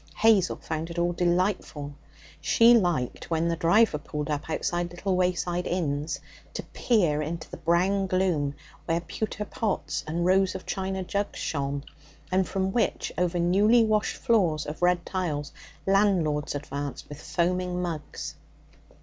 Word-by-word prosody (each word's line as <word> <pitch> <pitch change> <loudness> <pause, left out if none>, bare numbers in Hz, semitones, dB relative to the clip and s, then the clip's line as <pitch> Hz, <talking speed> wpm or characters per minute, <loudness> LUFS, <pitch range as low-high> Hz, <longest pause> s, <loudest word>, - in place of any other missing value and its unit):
Hazel 210 -5 +4
found 160 +1 -4
it 170 - -7
all 175 0 +1
delightful. 175 -4 0 0.5
She 235 0 +6
liked, 175 - 0
when 165 0 +1
the 170 - +1
driver 170 +1 +3
pulled 150 0 -4
up 145 +1 -3
outside 175 +2 -1
little 185 +2 -2
wayside 180 -1 0
inns, 155 -3 -1 0.4
to - - -3
peer 175 -11 +1
into 160 +2 -4
the - - -6
brown 185 +4 +2
gloom 175 -7 +1 0.3
where 165 +1 +1
pewter 210 +4 -4
pots 210 -1 -2
and 170 +3 -1
rows 190 +1 +3
of 190 - -6
china 190 -1 -2
jugs 200 +3 -2
shone, 140 -2 -2 0.5
and 185 0 +2
from 190 0 -1
which, 230 - 0
over 180 0 0
newly 205 +7 +4
washed 215 -1 +1
floors 185 - +2
of 150 +3 -6
red 175 -1 +3
tiles, 155 -7 -2 0.3
landlords 180 -8 +2
advanced 145 0 -5
with 145 +1 -9
foaming 180 +1 0
mugs. 165 -4 -4
175 Hz, 145 wpm, -27 LUFS, 155-190 Hz, 0.5 s, She